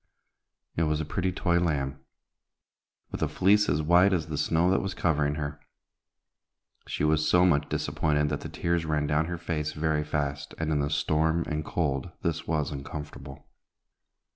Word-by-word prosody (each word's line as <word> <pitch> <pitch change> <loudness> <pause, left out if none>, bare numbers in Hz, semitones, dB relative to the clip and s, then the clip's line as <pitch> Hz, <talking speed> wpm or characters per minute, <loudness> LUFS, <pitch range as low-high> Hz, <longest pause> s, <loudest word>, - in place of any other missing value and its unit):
It 80 - +1
was 75 0 0
a 80 - -2
pretty 90 +4 -1
toy 85 -1 +1
lamb, 70 -5 -1 1.1
with - - -5
a - - +2
fleece 105 +3 +3
as 75 +2 +1
white 90 +5 +5
as 80 -3 -1
the 75 - -3
snow 85 +3 +2
that 95 - +2
was 95 -1 -4
covering 75 -3 +1
her. 75 -1 -4 1.3
She - - -3
was 75 0 +2
so 90 +2 +5
much 75 -5 +2
disappointed 75 -1 0
that 75 -1 -3
the - - -6
tears 85 -1 -1
ran 75 -2 0
down 75 +2 +1
her 85 +1 -4
face 80 -2 -3
very 75 -1 0
fast, 70 -2 -3
and 80 -1 -1
in 75 - +1
the 70 0 0
storm 80 +3 +1
and 75 -1 -2
cold 70 -2 -1
this 80 -1 -2
was 75 -3 0
uncomfortable. 70 -1 -8
75 Hz, 170 wpm, -28 LUFS, 75-85 Hz, 1.3 s, white